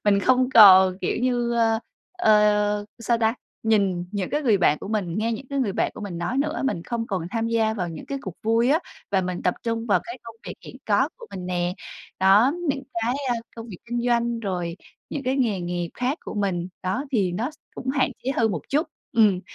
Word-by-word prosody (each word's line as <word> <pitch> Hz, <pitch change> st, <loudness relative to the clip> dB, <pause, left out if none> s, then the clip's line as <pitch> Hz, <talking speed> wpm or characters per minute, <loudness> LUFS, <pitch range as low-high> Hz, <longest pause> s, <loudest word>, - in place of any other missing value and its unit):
mình 200 Hz, -1 st, +4 dB
không 255 Hz, +3 st, +3 dB
còn, 190 Hz, -3 st, +8 dB
kiểu -, -, -1 dB
như, 240 Hz, -2 st, +1 dB
ơ, 225 Hz, -1 st, +2 dB, 0.3 s
ờ, 210 Hz, -, +3 dB
sao 230 Hz, 0 st, 0 dB
ta, 225 Hz, 0 st, +2 dB, 0.3 s
nhìn 200 Hz, -5 st, +1 dB
những 195 Hz, -3 st, -2 dB
cái 295 Hz, +1 st, 0 dB
người 230 Hz, -7 st, +4 dB
bạn 150 Hz, -4 st, +3 dB
của -, -, -8 dB
mình, 205 Hz, -4 st, -2 dB
nghe 230 Hz, +2 st, 0 dB
những 230 Hz, +4 st, -6 dB
cái 280 Hz, -, -1 dB
người 215 Hz, -7 st, 0 dB
bạn -, -, 0 dB
của -, -, -9 dB
mình 190 Hz, -5 st, -5 dB
nói 175 Hz, +10 st, -2 dB
nữa. 300 Hz, +1 st, -1 dB
Mình 220 Hz, -11 st, -1 dB
không 230 Hz, +3 st, -3 dB
còn 185 Hz, -6 st, -3 dB
tham 225 Hz, 0 st, -1 dB
gia 225 Hz, -1 st, +1 dB
vào 180 Hz, -5 st, -2 dB
những 165 Hz, -, -8 dB
cái 275 Hz, -, -4 dB
cuộc 190 Hz, -, -6 dB
vui 230 Hz, +3 st, +2 dB
á, 305 Hz, -, +4 dB, 0.3 s
và 195 Hz, -1 st, +2 dB
mình 180 Hz, -1 st, -4 dB
tập 180 Hz, -, +1 dB
trung 230 Hz, 0 st, -2 dB
vào 205 Hz, -, +3 dB
cái 240 Hz, +2 st, -8 dB
công 230 Hz, -1 st, -11 dB
việc -, -, -5 dB
hiện -, -, -10 dB
có -, -, +3 dB
của 470 Hz, -2 st, -12 dB
mình 180 Hz, -1 st, -6 dB
nè. 175 Hz, 0 st, -1 dB, 0.5 s
Đó, 200 Hz, +8 st, +5 dB, 0.2 s
những 275 Hz, -1 st, -1 dB, 0.2 s
cái, 240 Hz, +3 st, +1 dB
a, 245 Hz, -, +2 dB, 0.2 s
công 230 Hz, 0 st, -7 dB
việc 185 Hz, -, -9 dB
kinh 240 Hz, 0 st, -2 dB
doanh, 235 Hz, -1 st, +1 dB
rồi 180 Hz, -4 st, -3 dB, 0.3 s
những 285 Hz, -, -4 dB
cái 260 Hz, +1 st, 0 dB
nghề 225 Hz, -8 st, +1 dB
nghiệp 175 Hz, -1 st, -3 dB
khác 255 Hz, +5 st, -1 dB
của -, -, -6 dB
mình, 185 Hz, -4 st, -1 dB
đó, 195 Hz, +10 st, -1 dB
thì 195 Hz, -7 st, +1 dB
nó 225 Hz, +10 st, -2 dB
s 310 Hz, -, -19 dB, 0.2 s
cũng 260 Hz, -, -7 dB
hạn 270 Hz, -1 st, +1 dB
chế 260 Hz, -, 0 dB
hơn 225 Hz, -1 st, +3 dB
một 170 Hz, -6 st, -3 dB
chút, 300 Hz, +3 st, +1 dB, 0.3 s
ừm, 210 Hz, -6 st, +4 dB
220 Hz, 235 wpm, -24 LUFS, 190-240 Hz, 0.5 s, còn